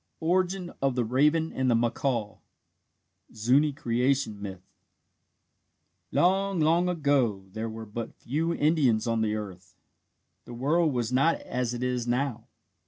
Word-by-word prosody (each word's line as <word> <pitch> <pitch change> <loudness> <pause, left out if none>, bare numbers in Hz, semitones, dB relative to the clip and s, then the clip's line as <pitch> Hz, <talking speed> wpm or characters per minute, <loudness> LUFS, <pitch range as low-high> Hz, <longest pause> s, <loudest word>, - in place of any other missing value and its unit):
'" - - -49
ORIGIN 180 +2 0
OF 135 -2 +1
THE 125 -2 0
RAVEN 150 +7 +2
AND 130 -1 0
THE 120 - +4
MACAW 115 -1 -1 1.0
(ZUNI 130 +7 +3
CREATION 125 -4 0
MYTH) 95 -2 -7 1.5
Long, 195 +1 +2
long 165 +3 +3
ago 140 - +1
there 110 +1 -3
were 110 0 -7
but 110 +2 -6
few 155 +7 -2
Indians 145 -9 +2
on 115 -1 0
the 110 -1 0
earth. 95 -4 -8 0.7
The 120 - -9
world 155 +6 +2
was 120 -2 -2
not 140 +6 +3
as 125 -1 -3
it 120 - -4
is 125 -1 -1
now. 125 0 -1
125 Hz, 140 wpm, -27 LUFS, 115-155 Hz, 1.5 s, THE